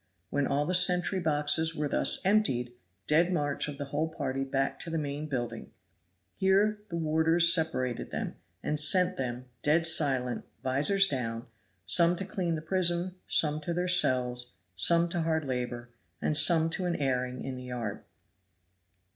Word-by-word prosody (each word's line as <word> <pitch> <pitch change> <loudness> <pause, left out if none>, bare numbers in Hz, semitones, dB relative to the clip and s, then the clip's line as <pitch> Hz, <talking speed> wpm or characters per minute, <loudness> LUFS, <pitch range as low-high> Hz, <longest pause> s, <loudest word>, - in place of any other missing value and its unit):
When 140 -1 0
all 145 +1 0
the 180 - -2
sentry 180 +1 +3
boxes 160 0 0
were 150 -1 -2
thus - - +1
emptied, 160 - +1 0.3
dead 165 +4 +2
march 145 -5 -1
of 145 -1 -7
the 145 - -5
whole 155 +2 -1
party 135 -4 -4
back 135 0 -2
to - - -7
the 165 - -3
main 145 0 -4
building; 120 -4 -5 0.6
here 205 +2 +1
the 170 - -4
warders 160 +1 +4
separated 130 -8 -1
them, - - -5 0.3
and 150 - -1
sent 180 +4 +3
them, 125 -4 -5 0.2
dead 160 +4 +2
silent, 135 -6 +4 0.2
vizors 150 +10 +2
down, 115 -5 -4 0.4
some 170 - +4
to 195 - -4
clean 180 -5 -3
the 155 - -6
prison, 175 +1 0
some 150 -1 +1
to 170 +3 -4
their 180 +1 -1
cells, 125 -8 +1 0.2
some 170 - +2
to 170 0 -2
hard 160 -1 -1
labor, 125 -2 -5 0.3
and 155 - -1
some 165 +1 +4
to 180 +2 -1
an 175 -1 -1
airing 125 -2 -2
in 130 - -5
the 125 0 -9
yard. 120 -5 -6
155 Hz, 165 wpm, -28 LUFS, 130-170 Hz, 0.6 s, warders